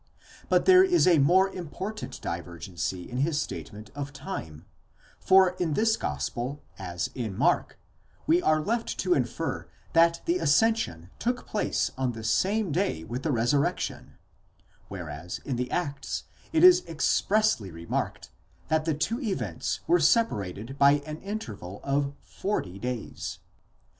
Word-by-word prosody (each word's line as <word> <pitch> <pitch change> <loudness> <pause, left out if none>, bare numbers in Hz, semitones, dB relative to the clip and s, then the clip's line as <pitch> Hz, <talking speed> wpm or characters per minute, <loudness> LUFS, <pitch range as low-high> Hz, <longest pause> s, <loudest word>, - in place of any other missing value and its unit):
° - - -35 0.5
But - - +3
there 370 0 +8
is 360 -2 +4
a 175 -4 +5
more 180 +7 +5
important 190 +5 -6
divergency 85 +1 -4
in 125 - -6
his 150 +2 +1
statement 105 -6 -6
of 145 0 -5
time; 135 - -7 0.5
for 190 -1 +6
in 160 -4 0
his 220 0 +3
gospel, 120 - -3 0.2
as 90 -2 -3
in 110 -6 -4
Mark, - - +1 0.5
we 170 +3 +4
are 155 -2 +3
left 225 +8 -2
to 360 - +3
infer - - -2 0.3
that 170 0 +5
the 345 +2 +1
ascension 145 - +2
took 245 +1 -1
place 210 - -1
on 130 -2 0
the 110 -1 -8
same 195 - +1
day 170 - 0
with 120 +9 -5
the 155 - 0
resurrection: 125 +4 0 0.7
whereas 85 -3 -6
in 135 - -2
the 125 +1 -2
Acts 145 -6 -3 0.3
it 325 +1 +3
is 365 0 +8
expressly 180 - +1
remarked, 85 0 -4 0.4
that 155 0 +2
the 160 -3 +1
two 190 - -1
events 130 - -2
were 175 +1 +4
separated 135 - +1
by 140 0 +7
an 155 0 -5
interval 110 - -6
of 140 0 0
forty 100 - -3
days. 125 -1 -4
145 Hz, 145 wpm, -27 LUFS, -, 0.7 s, there